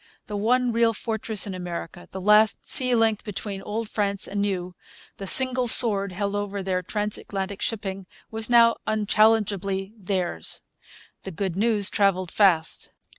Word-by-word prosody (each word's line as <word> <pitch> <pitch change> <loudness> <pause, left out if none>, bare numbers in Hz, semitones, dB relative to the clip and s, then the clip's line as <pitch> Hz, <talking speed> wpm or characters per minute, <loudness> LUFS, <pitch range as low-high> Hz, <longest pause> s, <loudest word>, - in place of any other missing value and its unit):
The 210 - -8
one 245 +4 0
real 230 0 0
fortress 220 -1 -3
in 200 - -7
America, 175 -1 -9
the 190 - -9
last 210 +2 +1
sea 255 -3 +6
link 225 -2 0
between 200 -1 -7
Old 220 +2 -6
France 200 -2 -4
and 200 0 -4
New, 185 -3 -4 0.4
the 195 - -9
single 255 +2 +7
sword 200 -4 +7
held 200 +2 -5
over 205 -1 -5
their 185 -1 -3
transatlantic 200 0 -5
shipping, 195 -4 -6 0.2
was 220 +1 -3
now 235 -1 +3
unchallengeably 210 -2 -1
theirs. 185 - -5 0.6
The - - -8
good 185 0 -5
news 210 -1 0
travelled 185 -4 -1
fast. 175 -6 -1
205 Hz, 145 wpm, -22 LUFS, 190-220 Hz, 0.6 s, single